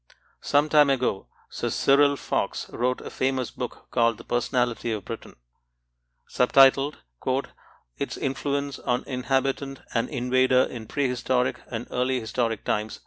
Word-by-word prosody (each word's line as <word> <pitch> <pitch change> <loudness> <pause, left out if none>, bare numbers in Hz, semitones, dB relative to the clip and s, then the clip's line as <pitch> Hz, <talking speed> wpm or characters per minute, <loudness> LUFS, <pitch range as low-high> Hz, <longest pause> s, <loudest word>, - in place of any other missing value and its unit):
Some 145 +1 +2
time 150 -2 +5
ago, 125 -7 0 0.2
Sir - - -2
Cyril 140 +1 +4
Fox - - -2
wrote 125 +2 -1
a - - -8
famous 130 -1 -1
book - - -6
called 115 -2 +2
The - - -11
Personality 120 -1 0
of 110 -2 -4
Britain, - - -8 0.9
sub 125 - 0
titled 135 +2 +6 1.0
"Its - - -3
Influence 140 0 -2
on 125 0 -1
Inhabitant 135 +1 -1
and 115 - 0
Invader 130 -1 +3
in 115 -3 -6
Prehistoric 125 -2 0
and 120 0 -5
Early 125 +1 0
Historic 115 -1 -2
Times." 105 +1 -2
130 Hz, 135 wpm, -25 LUFS, 120-135 Hz, 1.0 s, titled